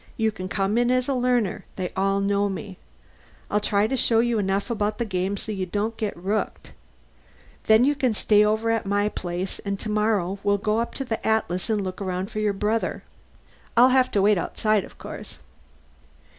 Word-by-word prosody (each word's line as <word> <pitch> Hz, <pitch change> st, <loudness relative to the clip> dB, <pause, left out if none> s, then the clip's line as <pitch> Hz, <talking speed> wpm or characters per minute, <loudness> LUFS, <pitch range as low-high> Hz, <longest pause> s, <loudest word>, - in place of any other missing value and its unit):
You 220 Hz, -1 st, +2 dB
can 185 Hz, -3 st, -7 dB
come 200 Hz, +3 st, +1 dB
in 240 Hz, 0 st, +2 dB
as 255 Hz, 0 st, +2 dB
a 275 Hz, -, +1 dB
learner; 245 Hz, -6 st, +1 dB
they 185 Hz, -2 st, -3 dB
all 195 Hz, +1 st, +1 dB
know 200 Hz, 0 st, +1 dB
me. 190 Hz, -1 st, -6 dB, 0.7 s
I'll 210 Hz, -, +3 dB
try 205 Hz, 0 st, +1 dB
to 255 Hz, +5 st, 0 dB
show 230 Hz, -2 st, +2 dB
you 235 Hz, -1 st, +2 dB
enough 195 Hz, +3 st, -1 dB
about 210 Hz, -1 st, -1 dB
the 235 Hz, -, -1 dB
game 190 Hz, 0 st, -1 dB
so 215 Hz, -, -5 dB
you 190 Hz, -3 st, -3 dB
don't 210 Hz, +5 st, -2 dB
get 215 Hz, -5 st, -3 dB
rooked. 200 Hz, +4 st, -3 dB, 1.0 s
Then 220 Hz, +2 st, +6 dB
you 285 Hz, +3 st, +4 dB
can 255 Hz, -5 st, 0 dB
stay 210 Hz, 0 st, +4 dB
over 220 Hz, +2 st, +1 dB
at 225 Hz, -3 st, -1 dB
my 205 Hz, +1 st, +1 dB
place 180 Hz, -1 st, -4 dB
and 200 Hz, -1 st, -4 dB
tomorrow 210 Hz, -3 st, 0 dB
we'll 200 Hz, 0 st, +2 dB
go 215 Hz, +2 st, 0 dB
up 235 Hz, -, -3 dB
to 270 Hz, -, -3 dB
the 225 Hz, -3 st, -3 dB
Atlas 220 Hz, -3 st, 0 dB
and 210 Hz, -2 st, +1 dB
look 185 Hz, +1 st, -5 dB
around 185 Hz, +2 st, -3 dB
for 215 Hz, -, -3 dB
your 210 Hz, -1 st, +2 dB
brother. 210 Hz, +3 st, -1 dB, 0.7 s
I'll 250 Hz, +2 st, +8 dB
have 255 Hz, 0 st, +4 dB
to 200 Hz, -, +3 dB
wait 205 Hz, -2 st, +4 dB
outside, 215 Hz, +3 st, 0 dB
of -, -, -16 dB
course." -, -, -8 dB
210 Hz, 200 wpm, -24 LUFS, 195-225 Hz, 1.0 s, I'll